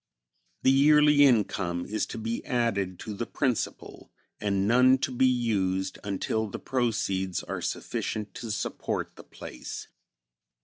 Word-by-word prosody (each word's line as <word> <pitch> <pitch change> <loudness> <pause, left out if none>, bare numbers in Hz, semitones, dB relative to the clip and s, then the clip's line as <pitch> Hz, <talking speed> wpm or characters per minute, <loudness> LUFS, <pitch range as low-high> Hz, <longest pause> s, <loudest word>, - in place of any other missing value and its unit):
The 130 - +6
yearly 150 +1 +6
income 100 -8 +1
is 110 +1 -2
to - - -7
be 115 +1 -3
added 100 -7 -1
to 110 - -5
the 115 +3 -4
principal, 130 -5 -3 0.3
and 100 -1 0
none 125 +3 +5
to 130 - -2
be 130 +1 +3
used 100 -7 0
until 105 +2 -1
the 100 - -6
proceeds 100 -7 -1
are - - -5
sufficient 105 -3 -3
to 115 - -7
support 105 - -3
the - - -12
place. - - -9
110 Hz, 135 wpm, -27 LUFS, 100-125 Hz, 0.3 s, The